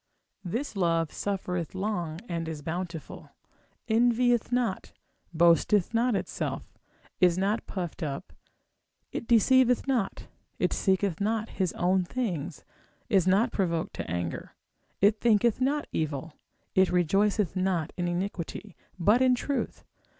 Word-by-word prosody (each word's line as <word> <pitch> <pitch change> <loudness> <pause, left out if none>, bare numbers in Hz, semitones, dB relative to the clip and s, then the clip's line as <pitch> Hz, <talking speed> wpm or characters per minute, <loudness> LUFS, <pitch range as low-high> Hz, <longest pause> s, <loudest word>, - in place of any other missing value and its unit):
This 230 +9 -3
love 165 -4 +1
suffereth 180 -4 -3
long, 180 -5 -2
it 165 -1 -3
is 155 -2 -6
bountiful, 170 0 -5 0.6
envieth 240 +1 +3
not, 245 -6 -1 0.4
boasteth 170 +4 +3
not 235 0 +2
itself, - - -4 0.5
is 180 -2 +4
not 200 +4 0
puffed 180 -4 -5
up, 150 +3 -4 0.8
it 235 - -5
deceiveth 250 +2 +4
not, 245 -7 -1 0.3
it - - +1
seeketh 190 -2 0
not 220 +1 0
his 185 -4 -1
own 185 +1 +2
things, 175 - -3 0.5
is 190 -3 +3
not 205 +6 +3
provoked 170 -5 -1
to - - -4
anger, 85 -1 -4 0.5
it 205 +2 +4
thinketh 235 +1 +3
not 290 +3 +1
evil, 155 0 -3 0.4
it 190 0 +4
rejoiceth 195 +3 +2
not 185 -3 0
in 175 -1 -2
iniquity, 185 +2 -4 0.2
but 210 +8 +4
in 255 -1 +5
truth. 280 +3 -3
190 Hz, 125 wpm, -28 LUFS, 170-225 Hz, 0.8 s, in